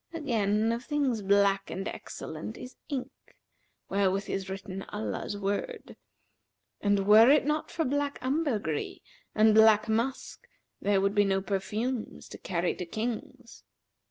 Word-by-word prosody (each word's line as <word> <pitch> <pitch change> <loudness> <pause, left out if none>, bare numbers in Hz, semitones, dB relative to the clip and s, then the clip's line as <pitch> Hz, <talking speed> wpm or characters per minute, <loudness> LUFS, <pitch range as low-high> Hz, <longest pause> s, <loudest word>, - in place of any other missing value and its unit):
Again, 225 -7 +1
of 235 +1 -3
things 270 -6 0
black 200 0 +2
and 195 +2 -4
excellent 160 +8 -7
is 250 - -10
ink, 270 -1 -3 0.8
wherewith 195 0 0
is 190 -1 -3
written 190 0 -6
Allah's 110 - -4
word; 205 - -4 0.9
and 200 -1 +2
were 215 +4 +8
it 290 -1 +5
not 300 +1 -1
for 325 - -2
black 285 +1 -1
ambergris 255 - -1 0.4
and 215 0 +5
black 220 0 +6
musk, 230 +4 -2 0.3
there 200 -1 +2
would 195 +1 +1
be 205 -1 +4
no 195 -1 +1
perfumes 215 +5 -3
to - - -10
carry 175 -1 -1
to 180 - -4
Kings. 230 +4 -5
215 Hz, 135 wpm, -29 LUFS, 195-255 Hz, 0.9 s, were